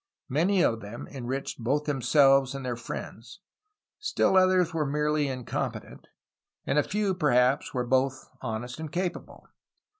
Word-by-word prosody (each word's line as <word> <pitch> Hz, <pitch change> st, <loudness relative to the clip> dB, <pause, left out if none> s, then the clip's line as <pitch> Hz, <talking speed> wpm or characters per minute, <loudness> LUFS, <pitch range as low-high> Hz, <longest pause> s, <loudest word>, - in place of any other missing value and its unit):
Many 175 Hz, +7 st, +2 dB
of 115 Hz, -, +1 dB
them 105 Hz, +3 st, -8 dB
enriched 135 Hz, 0 st, -4 dB
both 140 Hz, +5 st, +1 dB
themselves 135 Hz, 0 st, +3 dB
and 135 Hz, -1 st, -6 dB
their 125 Hz, -1 st, -2 dB
friends; 120 Hz, -, -8 dB, 0.6 s
still 425 Hz, -, +1 dB
others 185 Hz, -2 st, +4 dB
were 160 Hz, -2 st, 0 dB
merely 150 Hz, +1 st, 0 dB
incompetent; 130 Hz, -2 st, -5 dB, 0.6 s
and 150 Hz, -, +2 dB
a -, -, +5 dB
few, 205 Hz, +3 st, -1 dB
perhaps, 135 Hz, -5 st, +2 dB
were 125 Hz, -2 st, -2 dB
both 130 Hz, +1 st, 0 dB
honest 120 Hz, +2 st, -5 dB
and 160 Hz, -2 st, -6 dB
capable. 180 Hz, +1 st, -4 dB
140 Hz, 140 wpm, -27 LUFS, 125-160 Hz, 0.6 s, a